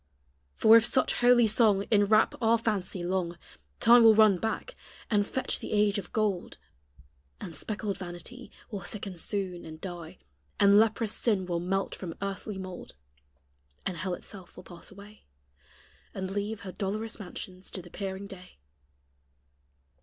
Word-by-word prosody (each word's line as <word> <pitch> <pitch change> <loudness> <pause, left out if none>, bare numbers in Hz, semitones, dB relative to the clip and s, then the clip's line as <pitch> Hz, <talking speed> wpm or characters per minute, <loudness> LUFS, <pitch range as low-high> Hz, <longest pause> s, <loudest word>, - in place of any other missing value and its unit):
For 220 - +7
if 230 - +4
such 260 +2 +1
holy 245 -1 +6
song 215 -2 +3
Inwrap 215 +1 +4
our 230 0 +4
fancy 200 -5 -2
long, 175 -1 -1 0.4
Time 235 +1 +7
will 225 -1 +8
run 215 -4 +6
back, 225 - -3 0.4
and 205 -1 +3
fetch 260 - -2
the - - -5
age 210 0 +3
of 185 - -9
gold; 210 -5 -1 0.8
And 165 - -8
speckled 205 +2 -3
vanity 185 +8 -8 0.2
Will 200 -4 -5
sicken 190 -1 -5
soon 185 -2 -3
and 155 0 -9
die, 175 -3 -8 0.4
And 200 +1 +7
leprous 220 0 +2
sin 205 -6 +1
will 175 -1 -1
melt 190 +3 -1
from 170 -4 -6
earthly 200 +1 -4
mould; 185 - -8 0.9
And 185 - -2
hell 185 +1 -2
itself 185 0 -11
will - - -10
pass 175 -2 -8
away. 200 +2 -14 0.9
And 190 0 -4
leave 205 +1 -3
her 190 - -7
dolorous 215 +4 -4
mansions 185 -1 -8
to 185 - -7
the 175 - -14
peering 195 0 -5
day. 185 -2 -12
200 Hz, 150 wpm, -29 LUFS, 185-215 Hz, 0.9 s, will